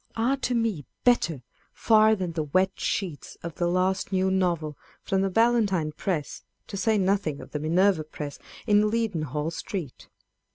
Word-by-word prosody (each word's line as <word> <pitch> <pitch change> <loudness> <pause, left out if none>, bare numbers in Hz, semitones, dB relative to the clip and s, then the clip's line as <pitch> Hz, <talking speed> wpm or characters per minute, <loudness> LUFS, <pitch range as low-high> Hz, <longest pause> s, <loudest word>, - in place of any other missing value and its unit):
are 235 +4 +2
to 255 -2 -2
me 225 -10 0 0.2
bettor 170 - +2 0.3
far 220 -1 +4
than 185 -4 -3
the 165 -1 -2
wet 185 +6 +1
sheets 175 -8 -3
of 170 -1 -5
the 175 - +1
last 185 +3 0
new 190 0 +2
novel 170 -5 0 0.3
from 190 0 0
the 195 - +1
Ballantyne 205 -7 +2
press, 155 -2 -3 0.2
to - - -8
say 215 +2 +2
nothing 190 -6 0
of - - -11
the 150 - -3
Minerva 170 +2 +2
press 150 -2 -7 0.3
in 210 -1 +4
Leadenhall 165 - -1
Street. 170 -5 -6
190 Hz, 160 wpm, -26 LUFS, 160-210 Hz, 0.3 s, far